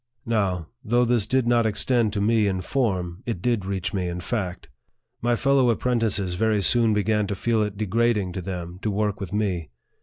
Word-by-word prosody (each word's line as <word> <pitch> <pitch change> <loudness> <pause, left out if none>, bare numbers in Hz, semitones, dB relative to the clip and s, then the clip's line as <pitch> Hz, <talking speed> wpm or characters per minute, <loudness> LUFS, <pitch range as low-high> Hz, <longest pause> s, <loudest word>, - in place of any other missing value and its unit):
Now, 100 -7 0 0.2
though 120 +3 +2
this 120 -3 +1
did 130 +1 +2
not 120 -1 +3
extend 110 +1 +1
to 100 - -1
me 110 0 +3
in 95 -2 -1
form, 95 -6 -1
it 115 -7 -2
did 110 0 0
reach 95 0 -2
me 95 -2 -1
in 90 0 -4
fact. 95 -2 -3 0.5
My 120 0 +2
fellow 135 0 +3
apprentices 115 -6 0
very 105 +2 +1
soon 115 +1 +3
began 105 0 +1
to 100 - -2
feel 115 +2 +1
it 105 -1 -2
degrading 110 -1 +1
to 95 - -4
them 90 -1 -6
to 110 - -1
work 105 0 -1
with 95 -3 -6
me. 95 -6 -1
105 Hz, 190 wpm, -24 LUFS, 95-115 Hz, 0.5 s, not